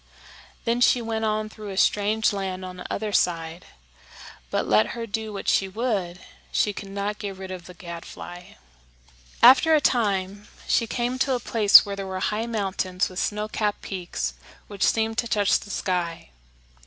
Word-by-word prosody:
Then 235 +1 +1
she 245 - +5
went 225 -1 -2
on 215 0 0
through 215 -1 -9
a 190 - -6
strange 210 +2 +2
land 190 -2 -4
on 180 0 -8
the 180 - -8
other 210 0 -3
side, 165 -1 0 0.8
but, - - -1
let 110 +1 +4
her 230 - -3
do 220 0 -4
what 200 - -7
she 195 - +3
would, 195 -4 -2 0.3
she 210 - +1
could 200 0 -8
not 200 +1 -3
get 200 -3 -5
rid 190 0 -8
of 180 -2 -8
the 180 - -12
gadfly. 175 0 -9 0.9
After 265 +6 +8
a - - +5
time 205 -6 0 0.2
she 230 - +2
came 245 +2 -2
to 265 -1 +2
a - - -2
place 215 -4 +6
where 200 -1 -4
there 195 -1 -5
were 190 0 -4
high 215 +4 -1
mountains 195 -4 -1
with 185 0 -6
snow 210 0 -1
capped 210 -1 -2
peaks 175 - -4 0.3
which 200 -1 -10
seemed 225 0 +2
to 235 - -1
touch 205 -2 +2
the - - -12
sky. 175 - -2
200 Hz, 180 wpm, -25 LUFS, 185-220 Hz, 0.9 s, After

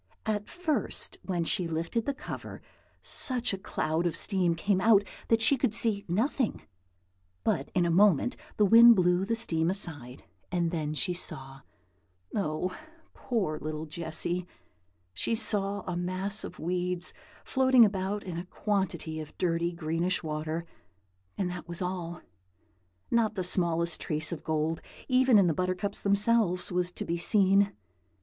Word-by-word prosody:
At 210 -2 -2
first, 315 - -2
when 175 -3 -2
she 170 +1 +1
lifted 165 - -2
the 280 - +1
cover, - - -8 0.4
such 250 -5 +1
a - - -2
cloud 165 -3 -1
of 165 - -2
steam 180 -4 +1
came 190 +2 0
out 205 -1 +5 0.2
that 225 0 +3
she 270 +4 +5
could 220 -3 +1
see 215 -4 +4
nothing; 225 - -1 0.8
but 135 - 0
in 180 -1 +3
a 170 - +1
moment 195 - +4 0.2
the 210 - +4
wind 230 +3 +8
blew 180 0 +2
the 230 +3 0
steam 170 -8 0
aside, 145 -10 -2 0.3
and 170 -2 0
then 155 -3 -2
she 180 +4 0
saw, 135 -6 -6 0.7
oh, 180 -1 -2 0.4
poor 190 -11 -2
little 155 0 -5
Jessy! 170 +3 -2 0.7
she 160 - -1
saw 200 -2 -1
a 180 -2 -5
mass 185 +4 -1
of - - -8
weeds 180 +1 -2 0.3
floating 260 -3 +5
about 200 0 -2
in 175 -3 -5
a 175 - -7
quantity 190 -5 -2
of 155 -1 -9
dirty, 170 -1 0
greenish 170 +2 -1
water, 155 +1 -3 0.7
and 190 - 0
that 175 -1 -7
was 170 0 -4
all. 180 -2 -4 0.9
Not 225 -2 +2
the 185 - -2
smallest 170 -2 +1
trace 155 0 -1
of 170 - -6
gold, 160 +1 -1 0.3
even 255 -2 +4
in 195 - +5
the 170 - +2
buttercups 185 +4 -2
themselves, 200 -2 +3
was 180 0 0
to - - -5
be 170 - -2
seen. 195 +1 +4
180 Hz, 150 wpm, -29 LUFS, 165-205 Hz, 0.9 s, wind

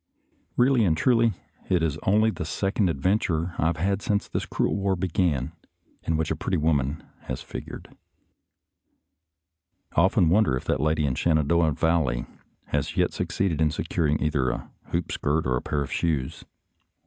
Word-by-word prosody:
Eeally 125 -1 +4
and 80 -2 +2
truly, 115 +1 +3 0.4
it 90 -3 +2
is 80 -2 -1
only 110 +3 +4
the - - -5
second 95 -1 0
adven 90 +8 +1
ture 85 +1 -1
I 80 - +2
have 85 -1 0
had 100 +4 0
since 100 0 0
this - - -3
cruel - - 0
war 100 -1 0
began, 85 -6 0 0.5
in 80 - -1
which 80 -1 -1
a - - +1
pretty 95 - -1
woman 75 -2 0 0.2
has 65 - -5
figured. - - -9 2.0
I - - +5
often 95 -1 +3
wonder 90 -8 +3
if - - -8
that - - 0
lady 75 0 +1
in 65 - 0
the - - -4
Shenandoah 80 0 +2
Valley 80 -7 +1 0.4
has - - -2
yet - - +2
succeeded 85 -6 -1
in 80 - +4
securing 75 0 0
either 70 -4 +1
a - - -5
hoop 85 0 -3
skirt 75 +2 0
or 65 -1 +1
a 60 - -1
pair 70 -1 -1
of 70 - -8
shoes. 75 -6 -1
80 Hz, 170 wpm, -25 LUFS, 75-95 Hz, 2.0 s, I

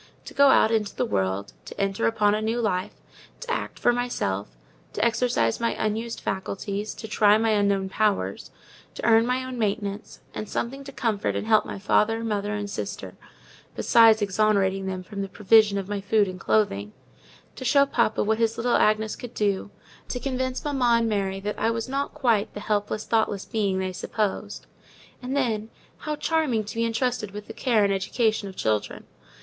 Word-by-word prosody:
To - - -9
go 280 0 +5
out 230 -4 +5
into 210 -3 0
the - - 0
world; 95 0 -2
to - - -10
enter 195 - 0
upon 205 - +2
a 215 - 0
new 225 +2 -1
life; 200 -3 -1 0.5
to - - -5
act - - -3
for 240 - +3
myself; 240 - -2 0.5
to - - 0
exercise 235 - +1
my 235 - 0
unused 225 +2 -2
faculties; 195 +2 -4
to 220 - -8
try 210 -1 +4
my 225 0 +1
unknown 200 -2 +2
powers; 190 - -1 0.5
to - - -5
earn 225 0 +5
my 255 +1 0
own 255 -1 -6
maintenance, 205 -1 -3
and 215 - -6
something 270 +4 -3
to 275 - -8
comfort 225 -6 -1
and - - -2
help 215 -1 +3
my - - -5
father, 225 +3 +1
mother, 210 -2 -2
and 205 0 -3
sister, 200 - -6 0.6
besides 225 -2 +5
exonerating 195 -1 +1
them 185 -1 -4
from 200 +1 -6
the 195 - -4
provision 210 +1 +4
of 195 -1 -3
my 205 -1 -3
food 205 +1 +2
and 185 0 -7
clothing; 105 - 0 0.6
to - - -7
show 280 +3 +4
papa 235 -5 +1
what 220 +1 0
his 230 0 +1
little 240 +1 +2
Agnes 215 0 +2
could 245 -1 -9
do; 205 -1 0 0.4
to 250 - -3
convince 260 0 -3
mamma 255 -5 +2
and 230 0 +1
Mary 195 -2 -1
that 205 +2 -4
I 225 - +2
was 230 +1 -2
not 275 +3 -3
quite 235 -8 +1
the - - -4
helpless, 210 0 -2
thoughtless 220 -3 0
being 200 -4 -1
they 185 0 -2
supposed. 210 +2 -3 0.6
And 260 +2 -3
then, 225 -5 -1 0.3
how 305 0 -4
charming 300 -8 0
to 210 - -8
be 230 0 +1
entrusted 230 -2 -1
with 205 +1 -8
the 225 - -9
care 230 -3 +2
and 200 -1 +2
education 215 +2 0
of 190 - -9
children! 110 - -2
215 Hz, 190 wpm, -25 LUFS, 200-235 Hz, 0.6 s, go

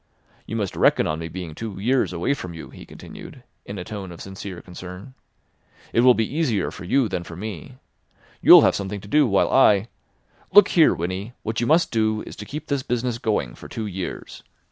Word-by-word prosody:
You 110 - -5
must 105 -4 -2
reckon - - +3
on 80 +1 -2
me 80 - -5
being 85 -1 -7
two 105 +2 -7
years 125 +3 +1
away 90 +10 0
from 90 -11 -7
you," 80 - -9
he - - -12
continued, - - -12 0.2
in 100 - -6
a 90 - -5
tone 95 -1 -7
of 85 - -11
sincere 95 -1 -8
concern. 90 +6 -10 0.8
"It - - +2
will 125 0 +6
be 110 - +1
easier 120 - 0
for 90 - -9
you 130 +6 +2
than 90 -3 -3
for 85 - -10
me. 95 -3 -7 0.7
You'll - - +10
have - - +4
something 100 +1 -4
to 100 - -12
do, 150 +5 +4
while 100 -3 +2
I—Look 120 - +2
here, 165 -3 +5
Winnie, 95 +7 -4
what 110 +1 -2
you 120 - 0
must 165 +3 +3
do 110 -1 0
is - - -10
to 105 - -7
keep 150 +8 -7
this 140 -2 -1
business 120 -1 -2
going 90 - -1
for - - -12
two 110 - -5
years. 95 -3 -6
105 Hz, 205 wpm, -23 LUFS, 90-120 Hz, 0.8 s, You'll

